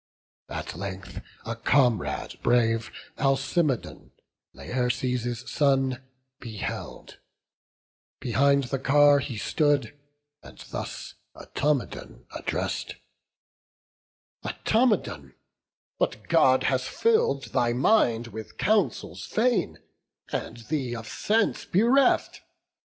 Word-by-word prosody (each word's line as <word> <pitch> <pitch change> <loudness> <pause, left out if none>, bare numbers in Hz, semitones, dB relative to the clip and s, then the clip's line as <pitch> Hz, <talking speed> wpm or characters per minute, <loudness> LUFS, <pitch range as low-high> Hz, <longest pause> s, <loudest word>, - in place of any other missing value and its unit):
At - - -5
length 95 +1 -6 0.2
a 115 +1 -3
comrade 120 -1 +1
brave, 115 -1 +2 0.3
Alcimedon, 135 +1 0 0.4
Laerces' 125 -1 -2
son, 135 -3 +1 0.4
beheld; 110 -4 -7 1.0
behind 140 +3 +3
the 135 +1 -3
car 145 +1 +5
He 130 -4 -5
stood, 145 +3 +1 0.5
and - - -14
thus - - -6 0.2
Automedon 145 -3 -3
address'd: - - -3 1.5
"Automedon, 225 0 0 0.6
what - - -1
God - - +5
has - - +1
fill'd 440 - +1
thy 120 -1 +2
mind 120 - +3
With 110 0 -9
counsels 215 0 0
vain, 235 0 +1 0.5
and 115 - -4
thee 125 0 -2
of 115 -1 -7
sense 220 0 0
bereft? 245 +8 +3
135 Hz, 85 wpm, -26 LUFS, 120-150 Hz, 1.5 s, car